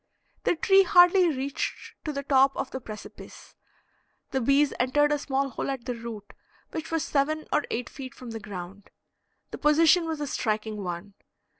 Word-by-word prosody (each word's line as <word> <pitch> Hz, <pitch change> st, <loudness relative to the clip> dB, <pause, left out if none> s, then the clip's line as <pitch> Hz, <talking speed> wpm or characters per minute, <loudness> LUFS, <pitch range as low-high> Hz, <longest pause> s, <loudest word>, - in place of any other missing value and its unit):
The -, -, +3 dB
tree 390 Hz, +4 st, +5 dB
hardly 355 Hz, 0 st, +6 dB
reached 275 Hz, -1 st, -4 dB
to 305 Hz, -, -1 dB
the 280 Hz, -1 st, -4 dB
top 270 Hz, 0 st, +3 dB
of 270 Hz, -1 st, -3 dB
the 260 Hz, -, -5 dB
precipice. 215 Hz, -2 st, -11 dB, 0.8 s
The 265 Hz, -, 0 dB
bees 275 Hz, +4 st, +3 dB
entered 290 Hz, +4 st, +3 dB
a 295 Hz, -, +1 dB
small 275 Hz, -1 st, -1 dB
hole -, -, -4 dB
at 265 Hz, -3 st, -4 dB
the 250 Hz, -, -2 dB
root, 230 Hz, -3 st, -8 dB, 0.4 s
which 320 Hz, 0 st, -5 dB
was 325 Hz, -1 st, 0 dB
seven 305 Hz, +2 st, 0 dB
or -, -, +2 dB
eight 240 Hz, +1 st, -3 dB
feet 265 Hz, -1 st, -9 dB
from 250 Hz, -2 st, -9 dB
the 225 Hz, -, -5 dB
ground. 200 Hz, -1 st, -9 dB, 0.6 s
The -, -, -7 dB
position 325 Hz, +3 st, +4 dB
was 320 Hz, -2 st, -3 dB
a 295 Hz, -, -2 dB
striking 215 Hz, -5 st, -2 dB
one. 180 Hz, +3 st, -6 dB
270 Hz, 175 wpm, -27 LUFS, 230-300 Hz, 0.8 s, hardly